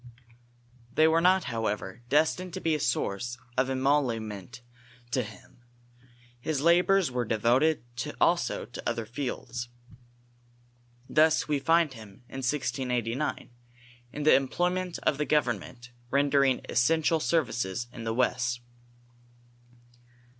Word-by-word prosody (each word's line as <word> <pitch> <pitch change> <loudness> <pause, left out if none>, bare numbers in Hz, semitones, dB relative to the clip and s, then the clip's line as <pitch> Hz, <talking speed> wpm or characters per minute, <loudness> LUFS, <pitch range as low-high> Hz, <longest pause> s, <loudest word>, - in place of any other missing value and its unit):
They 155 +1 +6
were 165 +1 +3
not, 185 +1 +4
however, 110 -4 -3
destined 160 +5 +1
to - - -3
be 165 -3 0
a 155 - 0
source 120 0 -1 0.2
of 130 +1 +1
emolument 125 -6 -1 0.5
to 130 - +1
Lim, 110 -1 -8 0.8
His 150 +3 -2
labors 175 +1 +4
were 125 -1 -1
devoted 120 +7 +2 0.4
also 175 0 +1
to 120 - -5
other 115 -1 -3
fields. 120 0 -5 1.4
Thus 155 +1 +3
we 150 -2 +1
find 165 +1 +3
hin^, 110 -3 -12
in 135 - -7
1689, 125 -1 -2 0.6
in 150 - -5
the 155 - +6
employment 180 +6 0
of 140 - +1
the 150 - +1
government, 120 - -1 0.2
rendering 140 -1 +3
essential 160 +5 +2
services 120 - 0
in 115 - -8
the 115 0 -2
west. 120 -1 0
130 Hz, 115 wpm, -28 LUFS, 120-155 Hz, 1.4 s, They